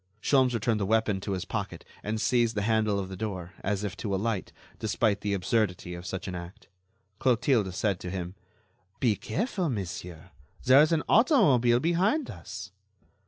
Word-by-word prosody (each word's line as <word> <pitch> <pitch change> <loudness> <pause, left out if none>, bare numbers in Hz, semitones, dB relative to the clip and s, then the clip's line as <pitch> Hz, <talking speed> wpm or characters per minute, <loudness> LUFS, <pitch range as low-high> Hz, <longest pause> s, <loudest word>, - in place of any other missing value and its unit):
Sholmes 130 +1 +3
returned 115 -1 0
the 100 - 0
weapon 110 -2 +2
to 100 - -3
his 95 - -3
pocket - - -5 0.2
and 110 +1 -3
seized 120 -1 +2
the 105 - 0
handle 110 -1 +2
of 95 -1 -3
the 95 - -7
door, 95 -3 -5
as 100 +1 -2
if 100 -3 -3
to 100 -3 -2
alight, 105 0 -2 0.3
despite 105 -1 0
the 100 -1 0
absurdity 90 -2 -1
of 90 +1 -7
such 95 +1 -4
an 95 - -4
act. 85 +1 -9 0.5
Clotilde 120 -5 +2
said 95 0 -1
to 90 - -6
him: 90 -1 -4 0.7
"Be 115 -5 +3
careful, 190 - -2
monsieur, 90 - -6 0.3
there 130 +2 +7
is 155 +2 +3
an 160 -2 +2
automobile 145 - +5
behind 185 - +1
us." 95 -2 -8
105 Hz, 170 wpm, -28 LUFS, 95-125 Hz, 0.7 s, there